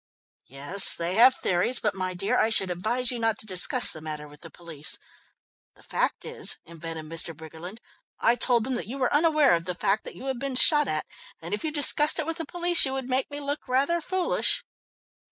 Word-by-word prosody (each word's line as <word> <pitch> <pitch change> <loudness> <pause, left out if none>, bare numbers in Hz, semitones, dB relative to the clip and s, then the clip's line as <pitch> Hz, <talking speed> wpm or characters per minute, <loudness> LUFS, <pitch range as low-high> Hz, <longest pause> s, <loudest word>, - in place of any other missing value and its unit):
"Yes, 145 +9 +5
they 170 +1 -4
have 250 +5 +4
theories, 185 +4 +1
but 210 -2 -2
my 185 -1 -5
dear, 195 +3 -2
I 220 - +1
should 195 -4 +3
advise 235 +8 -1
you 245 - -6
not 225 -1 -2
to - - -4
discuss 215 +6 +2
the 155 - -7
matter 150 -1 -8
with 145 0 -17
the 165 - -13
police. 160 -4 -6 0.8
The - - -22
fact - - -3
is," - - +1
invented 165 -1 -10
Mr. 165 +1 -1
Briggerland, 160 +5 -12 0.4
"I 230 - +2
told 240 -1 +1
them 260 - -4
that 240 - -5
you 255 +5 -8
were 255 -2 -2
unaware 305 - +2
of 170 0 -2
the 180 0 -5
fact 195 +4 -2
that - - -10
you 260 - -12
had 265 -2 -5
been 275 0 -6
shot 295 +3 +5
at, - - -4 0.3
and - - -9
if 420 - -4
you 315 - -4
discussed 295 0 +3
it 320 - -1
with 330 +1 -4
the 325 - -6
police, 350 0 +4
you 265 - +4
would 265 -1 -6
make 260 +1 -2
me 290 0 -8
look 285 +1 -7
rather 280 +7 -1
foolish." 370 +2 +1
235 Hz, 220 wpm, -24 LUFS, 175-280 Hz, 0.8 s, Yes